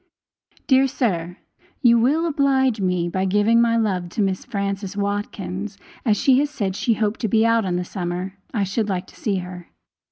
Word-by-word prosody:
Dear 265 -1 +4
sir, 180 - -2 0.5
you 235 -1 +6
will 295 +8 +2
oblige 265 -7 +2
me 180 -2 0
by 185 +2 -1
giving 210 +4 +3
my 230 -1 +3
love 190 -6 0
to 210 - -2
Miss 190 -1 -1
Frances 200 0 -3
Watkins, 200 -1 -3 0.3
and 230 - +2
as - - -1
she 270 +1 +4
said 200 -10 -3
she 230 +2 +1
hoped 215 0 -1
to 225 - -1
be 220 +2 +3
out 230 -2 +3
in 180 -2 -1
the 180 0 -2
summer, 180 0 -4 0.2
I 215 -5 0
should 205 +3 -1
like 185 -2 -2
to - - -18
see 205 -3 -1
her. 180 -1 -6
205 Hz, 190 wpm, -22 LUFS, 185-230 Hz, 0.5 s, you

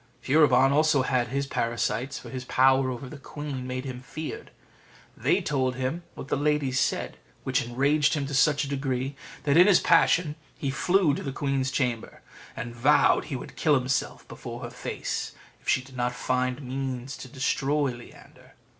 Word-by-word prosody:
Furibon 135 -2 +4
also 150 -1 +3
had 125 -2 +1
his 140 +3 -2
parasites, 120 0 -2
for - - -10
his 130 -1 -5
power 130 +1 +3
over 130 +1 -5
the 145 +2 -10
queen 140 -2 -6
made 130 +1 -4
him 130 -2 -6
feared; 155 +4 -7 0.7
they - - +1
told 130 -3 0
him 130 +7 -2
what - - -8
the - - 0
ladies 145 -3 +1
said, - - -1 0.3
which 130 +2 +1
enraged 140 +6 +2
him 145 -2 -1
to 140 - -6
such 150 +2 +3
a - - -4
degree 135 -1 -2 0.3
that 145 +1 +3
in 180 +3 +8
his 200 - +6
passion 165 -2 +3 0.2
he 140 - -2
flew 175 +2 +2
to - - -3
the 135 - -4
queen's 135 -1 -1
chamber, 125 -4 -2 0.3
and 120 0 -6
vowed 145 +5 +4
he 145 - -4
would 125 - -8
kill 150 -2 +3
himself 130 0 -1
before - - -8
her - - -6
face - - -4 0.3
if - - -6
she 130 - +3
did 135 0 -15
not 125 0 -1
find 130 +2 -1
means 130 0 -4
to - - -9
destroy 140 +1 0
Leander. 120 -1 -14
135 Hz, 180 wpm, -27 LUFS, 130-145 Hz, 0.7 s, in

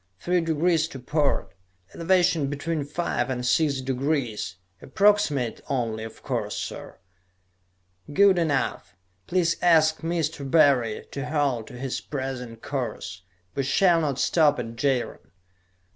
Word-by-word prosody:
Three 180 - +1
degrees 165 0 +1
to 135 - -9
port; 145 +3 0 0.4
elevation 175 -3 +2
between 145 +1 -3
five 150 0 -2
and 125 -1 -2
six 140 +1 +2
degrees. 130 -6 -2 0.3
Approximate 150 - +2
only, 115 -5 -1
of 110 - -10
course, - - -2
sir." - - -6 1.1
"Good 195 +3 +5
enough. 140 - -1 0.3
Please 175 -2 +1
ask 160 -2 +4
Mr. 160 -4 -2
Barry 135 -8 +3
to 140 +1 -4
hold 140 -7 0
to 125 - -10
his 130 0 -3
present 130 -5 -5
course. 110 -8 -4 0.3
We 140 - -1
shall 170 +5 +3
not 140 -4 -1
stop 150 +2 +3
at 115 0 -5
Jaron." 125 - -1
145 Hz, 125 wpm, -25 LUFS, 125-165 Hz, 1.1 s, Good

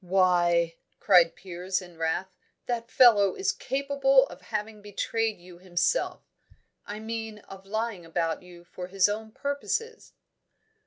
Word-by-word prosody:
"Why," 175 -2 +3 0.2
cried 175 -4 +5
Piers, 180 0 -3
in 175 -2 -12
wrath, 165 +4 -2 0.3
"that 235 -1 -3
fellow 205 -7 +6
is 190 +1 +1
quite - - -14
capable 275 -1 +3
of - - -12
having 215 -1 -5
betrayed 220 +2 -2
you 175 0 -15
himself. 180 - 0 0.6
I 205 +1 -5
mean, 225 -1 -5
of 195 0 -12
lying 220 -3 -2
about 165 0 -2
you 175 -1 -14
for 180 +1 -8
his 190 0 +3
own 220 +1 -4
purposes." 285 - -3
195 Hz, 140 wpm, -27 LUFS, 180-225 Hz, 0.6 s, fellow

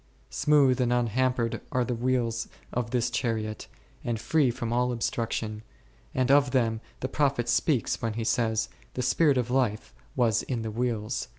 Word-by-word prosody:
Smooth 140 -4 +3
and 120 -1 +1
unhampered 120 0 +1
are 125 -1 +1
the 125 - -2
wheels 120 -1 0 0.3
of 120 -2 -1
this 125 0 0
chariot, 110 -4 -2 0.4
and 115 -2 -2
free 150 +1 +2
from 120 -1 -3
all 125 +1 +2
obstruction, 115 -2 -2 0.5
and 130 0 +2
of 140 0 +5
them 115 -4 +1 0.2
the 130 - -1
prophet 135 -3 0
speaks 120 +1 +1
when 115 -1 -1
he 115 +1 -3
says, 110 -1 +1 0.3
The 125 - -1
spirit 140 +3 +3
of 125 -1 -1
life 120 -5 0 0.2
was 115 -4 +2
in 120 -4 -3
the 110 - -3
wheels 120 +1 -2
v. - - -25
120 Hz, 170 wpm, -27 LUFS, 115-130 Hz, 0.5 s, of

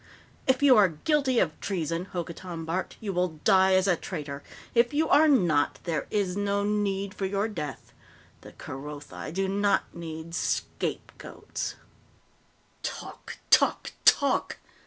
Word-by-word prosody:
"If 260 +1 +2
you 270 -3 +8
are 200 -3 +6
guilty 260 - +1
of 165 -8 +1
treason," 170 -2 -2
Hokotan 170 -2 -6
barked, 170 +3 -3
"you 205 -3 -4
will 180 -3 -1
die 190 0 +5
as 185 0 +3
a 180 - +4
traitor! 145 -5 -6 0.3
If 240 +4 +3
you 315 +2 +2
are 305 +2 +6
not, 175 - +3
there 165 -3 -2
is 195 -4 0
no 200 0 0
need 200 -1 -1
for 195 - -2
your 200 +2 0
death. 150 -10 -6 0.5
The - - -13
Kerothi 145 +2 -8
do 190 +3 -1
not 200 +1 +1
need 165 -1 -7
scapegoats!" - - -4 1.1
"Talk, - - -7
talk, - - +4
talk!" 280 -2 +3
190 Hz, 135 wpm, -27 LUFS, 165-205 Hz, 1.1 s, you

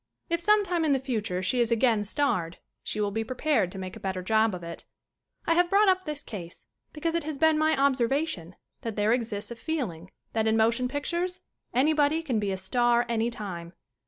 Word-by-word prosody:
If 335 0 +1
sometime 380 -3 +3
in 300 -3 +3
the 270 - +2
future 215 -8 -2
she 245 +6 +1
is 235 0 +1
again 230 -2 +3
starred 190 - 0 0.2
she 215 - -4
will 205 -1 0
be 225 +2 -1
prepared 250 - 0
to - - -8
make 185 -1 -6
a - - -9
better 190 -1 -3
job 220 +1 +2
of 175 - -8
it. 170 0 -8 0.6
I 330 - +3
have 350 +1 +3
brought 400 +1 +5
up 370 0 +2
this 300 -1 -5
case 175 -6 -8 0.3
because 325 +2 -2
it 335 -1 0
has 305 -1 -4
been 320 +1 +4
my 310 -2 +2
observation 265 - +1 0.3
that 225 -2 -4
there 210 +2 +3
exists 225 -3 -3
a - - -5
feeling 225 - -4 0.2
that 220 -1 +1
in 220 0 +3
motion 235 +3 +2
pictures 340 +7 -2 0.3
anybody 300 +4 +3
can 250 -8 0
be 205 -2 -1
a 190 - -2
star 240 +5 +2
anytime. 210 -7 -3
240 Hz, 200 wpm, -27 LUFS, 205-310 Hz, 0.6 s, brought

